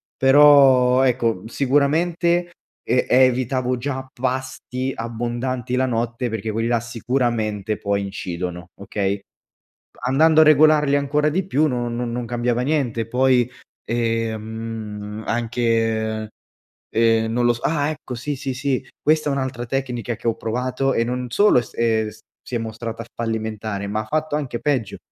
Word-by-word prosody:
però 135 Hz, -2 st, +6 dB
ecco, 115 Hz, -6 st, +1 dB
sicuramente 165 Hz, +7 st, +1 dB, 0.4 s
e 125 Hz, +2 st, +3 dB
evitavo 130 Hz, 0 st, +3 dB
già 130 Hz, +1 st, -4 dB
pasti 130 Hz, 0 st, -3 dB
abbondanti 120 Hz, +2 st, -3 dB
la 130 Hz, +1 st, +2 dB
notte, 120 Hz, 0 st, -2 dB
perché 110 Hz, 0 st, -3 dB
quelli 115 Hz, +2 st, -1 dB
là 120 Hz, -1 st, +2 dB
sicuramente 115 Hz, -3 st, -1 dB
poi 100 Hz, -1 st, -1 dB
incidono, 90 Hz, -3 st, -5 dB
okay, 100 Hz, 0 st, -2 dB, 0.9 s
andando 160 Hz, +4 st, +5 dB
a -, -, +8 dB
regolarli 150 Hz, -1 st, +5 dB
ancora 145 Hz, +1 st, +1 dB
di 180 Hz, +5 st, 0 dB
più 155 Hz, -4 st, +2 dB
no 120 Hz, -3 st, -1 dB
non 120 Hz, 0 st, -3 dB
non 120 Hz, 0 st, -3 dB
cambiava 120 Hz, +1 st, -1 dB
niente 125 Hz, -6 st, -1 dB
poi, 125 Hz, 0 st, +3 dB, 0.3 s
ehm, 110 Hz, -2 st, -3 dB
anche, 115 Hz, -2 st, 0 dB, 0.6 s
ehm, 115 Hz, 0 st, +2 dB
non 120 Hz, +1 st, +1 dB
lo 120 Hz, -, +4 dB
s 120 Hz, -, -8 dB
ah 150 Hz, -2 st, +1 dB
ecco 155 Hz, -4 st, -6 dB
sì, 125 Hz, +4 st, -3 dB
sì, 135 Hz, 0 st, -4 dB
sì 135 Hz, 0 st, -1 dB, 0.2 s
questa 155 Hz, -1 st, +2 dB
è -, -, 0 dB
un'altra 130 Hz, -3 st, -3 dB
tecnica 120 Hz, -3 st, -3 dB
che 115 Hz, -, -6 dB
ho 115 Hz, -, +2 dB
provato 125 Hz, +4 st, -1 dB
e 115 Hz, -, +2 dB
non 125 Hz, +1 st, -3 dB
solo 205 Hz, -, +5 dB
s 120 Hz, -, -7 dB
ehm, 110 Hz, -2 st, +1 dB, 0.3 s
si -, -, -12 dB
è -, -, 0 dB
mostrata 115 Hz, 0 st, -5 dB
fallimentare, 110 Hz, -3 st, -3 dB
ma 105 Hz, +1 st, -1 dB
ha 110 Hz, -, -8 dB
fatto 155 Hz, +5 st, -1 dB
anche 135 Hz, -5 st, -3 dB
peggio, 130 Hz, -9 st, -1 dB
120 Hz, 145 wpm, -21 LUFS, 115-135 Hz, 0.9 s, a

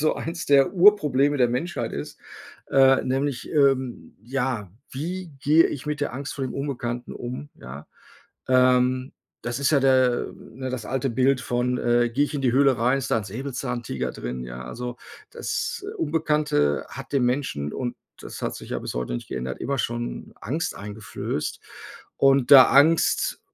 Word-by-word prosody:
so 155 Hz, -, +2 dB
eins 170 Hz, +1 st, -5 dB
der 140 Hz, -1 st, +4 dB
Urprobleme 150 Hz, -8 st, +4 dB
der 125 Hz, -3 st, +3 dB
Menschheit 160 Hz, +9 st, -3 dB
ist, -, -, -6 dB, 0.5 s
äh, 135 Hz, 0 st, +5 dB
nämlich, 135 Hz, 0 st, -2 dB
ähm, 135 Hz, -, +1 dB
ja, 125 Hz, -5 st, -2 dB, 0.2 s
wie 175 Hz, +6 st, -5 dB
gehe 155 Hz, +3 st, +5 dB
ich 140 Hz, -1 st, -6 dB
mit 150 Hz, 0 st, -2 dB
der 145 Hz, -, -1 dB
Angst 140 Hz, +2 st, -5 dB
vor 135 Hz, -, -3 dB
dem 130 Hz, -, -5 dB
Unbekannten 125 Hz, -4 st, -4 dB
um, 125 Hz, +4 st, -6 dB
ja? 70 Hz, +4 st, -10 dB, 0.6 s
Ähm, 130 Hz, 0 st, +3 dB, 0.3 s
das 120 Hz, 0 st, -3 dB
ist 140 Hz, -, +2 dB
ja 145 Hz, -, +4 dB
der 130 Hz, -2 st, +2 dB
ne, 130 Hz, +3 st, -8 dB
das 125 Hz, -5 st, -5 dB
alte 135 Hz, 0 st, -1 dB
Bild 130 Hz, +2 st, +2 dB
von, 125 Hz, 0 st, -1 dB
äh, 120 Hz, 0 st, +2 dB
gehe 135 Hz, +5 st, +2 dB
ich 145 Hz, -, -6 dB
in 145 Hz, -, -1 dB
die 125 Hz, -3 st, +2 dB
Höhle 135 Hz, -1 st, +4 dB
rein, 125 Hz, +4 st, +2 dB
ist 135 Hz, -, -4 dB
da -, -, +3 dB
'n 105 Hz, -, -5 dB
Säbelzahntiger 125 Hz, +2 st, -4 dB
drin, 60 Hz, +1 st, -5 dB
ja? 60 Hz, +1 st, -8 dB
Also, 120 Hz, -, -6 dB, 0.3 s
das 460 Hz, -3 st, -3 dB
Unbekannte 150 Hz, -, +1 dB
hat -, -, -9 dB
dem 135 Hz, -3 st, +2 dB
Menschen 125 Hz, -, -2 dB
und 120 Hz, -2 st, -4 dB, 0.2 s
das -, -, -9 dB
hat -, -, -2 dB
sich -, -, -11 dB
ja -, -, -1 dB
bis -, -, -6 dB
heute 60 Hz, 0 st, -3 dB
nicht -, -, -6 dB
geändert, 65 Hz, 0 st, -5 dB
immer 140 Hz, -, -1 dB
schon 120 Hz, 0 st, -4 dB
Angst 155 Hz, +9 st, -2 dB
eingeflößt 105 Hz, +1 st, -5 dB, 0.6 s
und 135 Hz, -1 st, +3 dB
da 130 Hz, -2 st, +11 dB
Angst, 155 Hz, +4 st, +3 dB
130 Hz, 170 wpm, -24 LUFS, 120-140 Hz, 0.6 s, da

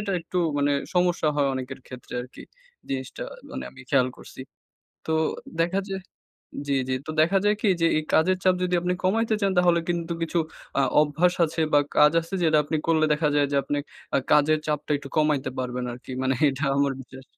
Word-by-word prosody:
এটা 200 Hz, -1 st, -2 dB
একটু 180 Hz, +2 st, -4 dB, 0.2 s
মানে 145 Hz, 0 st, +2 dB, 0.2 s
সমস্যা 175 Hz, -3 st, +2 dB
হয় 140 Hz, -2 st, +2 dB
অনেকের 130 Hz, 0 st, -6 dB
ক্ষেত্রে 125 Hz, -1 st, -11 dB
আরকি, 125 Hz, -, -12 dB, 0.5 s
জিনিসটা 130 Hz, -1 st, -4 dB, 0.3 s
মানে 65 Hz, -, -5 dB
আমি -, -, -14 dB
খেয়াল 130 Hz, -3 st, +4 dB
করছি। -, -, -12 dB, 0.7 s
তো 160 Hz, -, -1 dB, 0.5 s
দেখা 180 Hz, +4 st, +1 dB
যায় 195 Hz, 0 st, -4 dB, 0.7 s
জি, 140 Hz, -, +1 dB
জি। 130 Hz, -, +1 dB
তো -, -, -4 dB
দেখা 195 Hz, +5 st, +4 dB
যায় 210 Hz, -, +4 dB
কী? 215 Hz, -, +2 dB
যে 165 Hz, -, +4 dB
এই -, -, -1 dB
কাজের 185 Hz, +4 st, +4 dB
চাপ 185 Hz, -, +5 dB
যদি 180 Hz, 0 st, 0 dB
আপনি 180 Hz, +1 st, 0 dB
কমাইতে 220 Hz, +4 st, +2 dB
চান, 200 Hz, -1 st, +2 dB
তাহলে 175 Hz, -1 st, +4 dB
কিন্তু 170 Hz, -1 st, -1 dB
কিছু 165 Hz, +1 st, 0 dB, 0.4 s
অ্যা 140 Hz, -, +3 dB, 0.2 s
অভ্যাস 155 Hz, +4 st, +2 dB
আছে 165 Hz, +1 st, -3 dB
বা, 145 Hz, -, +7 dB, 0.2 s
কাজ 150 Hz, +1 st, +6 dB
আছে, 165 Hz, +4 st, -8 dB
যেটা 155 Hz, -2 st, +4 dB
আপনি 155 Hz, +2 st, -1 dB
করলে 160 Hz, -1 st, +3 dB
দেখা 150 Hz, 0 st, +1 dB
যায় 145 Hz, -1 st, +3 dB
যে -, -, +2 dB
আপনি 145 Hz, -, -2 dB, 0.4 s
আ -, -, +4 dB
কাজের 150 Hz, +1 st, +4 dB
চাপটা 150 Hz, 0 st, -2 dB
একটু 140 Hz, -1 st, -9 dB
কমাইতে 150 Hz, -4 st, +2 dB
পারবেন 125 Hz, -1 st, -3 dB
আরকি। 125 Hz, +2 st, -9 dB
মানে 130 Hz, 0 st, +1 dB
এটা 140 Hz, +2 st, -2 dB
আমার 140 Hz, -1 st, +2 dB
বিশ্বাস। 130 Hz, +1 st, -12 dB
155 Hz, 195 wpm, -25 LUFS, 140-175 Hz, 0.7 s, বা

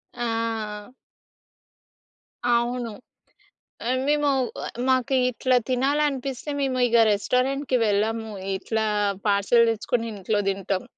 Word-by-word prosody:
ఆ! 225 Hz, -2 st, -3 dB, 1.6 s
అవును. 240 Hz, 0 st, 0 dB, 1.0 s
ఆహ్, 255 Hz, +1 st, +1 dB
మేము 295 Hz, -1 st, +2 dB, 0.6 s
మాకు 260 Hz, 0 st, +2 dB, 0.2 s
ఇట్లా 255 Hz, +1 st, +1 dB
తినాలనిపిస్తే 275 Hz, +1 st, 0 dB
మేము 265 Hz, -2 st, 0 dB
ఇగ 235 Hz, 0 st, +4 dB
రెస్టారెంట్‌కి 255 Hz, +6 st, 0 dB
వెళ్ళము. 220 Hz, +2 st, 0 dB, 0.3 s
ఇట్లా 220 Hz, +3 st, -2 dB, 0.4 s
పార్సెల్ 205 Hz, +4 st, +4 dB
తెచ్చుకొని 225 Hz, +1 st, -1 dB
ఇంట్లో 205 Hz, +1 st, -1 dB
తింటాం. 195 Hz, -1 st, -2 dB
235 Hz, 90 wpm, -24 LUFS, 215-260 Hz, 1.6 s, ఇగ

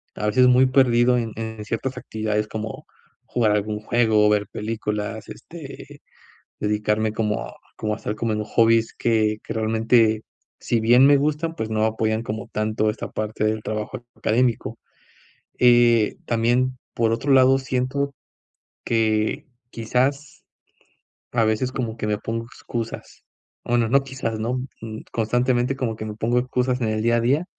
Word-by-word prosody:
a 105 Hz, -, -2 dB
veces 125 Hz, +4 st, +4 dB
muy 125 Hz, +1 st, +5 dB
perdido 125 Hz, -2 st, +4 dB
en 115 Hz, -2 st, -2 dB
en 110 Hz, -1 st, -6 dB
ciertas 120 Hz, +4 st, -3 dB
actividades 105 Hz, -1 st, -2 dB
como, 110 Hz, 0 st, -6 dB, 0.4 s
jugar 115 Hz, -3 st, +1 dB
algún 105 Hz, 0 st, -1 dB
juego 110 Hz, -2 st, +3 dB
o -, -, +4 dB
ver 105 Hz, -1 st, +1 dB
películas, 105 Hz, 0 st, -4 dB
este, 160 Hz, -5 st, -11 dB, 0.6 s
dedicarme 105 Hz, +1 st, 0 dB
como 105 Hz, -1 st, -2 dB, 0.2 s
como 105 Hz, -1 st, -2 dB
a -, -, -2 dB
hacer 105 Hz, -, -4 dB
como 115 Hz, 0 st, -1 dB
en 105 Hz, 0 st, -2 dB
hobbies 115 Hz, +1 st, +3 dB
que 110 Hz, -2 st, +1 dB
que -, -, -5 dB
realmente, 110 Hz, 0 st, +2 dB, 0.4 s
si 115 Hz, -, 0 dB
bien 120 Hz, +4 st, +6 dB
me 145 Hz, 0 st, +6 dB
gustan, 155 Hz, +3 st, -1 dB
pues 110 Hz, -7 st, -4 dB
no 110 Hz, 0 st, 0 dB
apoyan 110 Hz, 0 st, 0 dB
como 110 Hz, +1 st, -5 dB
tanto 110 Hz, 0 st, 0 dB
esta 105 Hz, +1 st, -4 dB
parte 110 Hz, 0 st, -3 dB
del 110 Hz, 0 st, 0 dB
trabajo 105 Hz, +1 st, -4 dB
académico. 115 Hz, 0 st, 0 dB, 0.8 s
Eh, 120 Hz, -3 st, +4 dB
también, 120 Hz, +3 st, +1 dB, 0.2 s
por 115 Hz, -1 st, +1 dB
otro 135 Hz, +5 st, -1 dB
lado 130 Hz, 0 st, +6 dB
siento, 135 Hz, +2 st, -2 dB, 0.7 s
que, 110 Hz, +5 st, 0 dB, 0.2 s
quizás, 135 Hz, +6 st, -1 dB, 0.9 s
a 120 Hz, -, +2 dB
veces 110 Hz, +4 st, 0 dB
como 115 Hz, -4 st, -3 dB
que 110 Hz, -, -3 dB
me 105 Hz, -1 st, 0 dB
pongo 115 Hz, +2 st, -4 dB
excusas, 115 Hz, -1 st, -7 dB, 0.4 s
bueno, 120 Hz, -1 st, +1 dB
no 135 Hz, +4 st, +4 dB
quizás 130 Hz, -5 st, -4 dB
no, 120 Hz, +4 st, -1 dB, 0.2 s
mm, 110 Hz, -1 st, -7 dB
constantemente 120 Hz, +3 st, +1 dB
como 120 Hz, -4 st, -2 dB
que 110 Hz, -, -6 dB
me 105 Hz, -1 st, -5 dB
pongo 115 Hz, +3 st, 0 dB
excusas 125 Hz, 0 st, 0 dB
en 115 Hz, -, 0 dB
el 110 Hz, 0 st, -1 dB
día 120 Hz, +1 st, +3 dB
a -, -, +2 dB
día, 135 Hz, +8 st, +2 dB
115 Hz, 155 wpm, -23 LUFS, 110-125 Hz, 0.9 s, bien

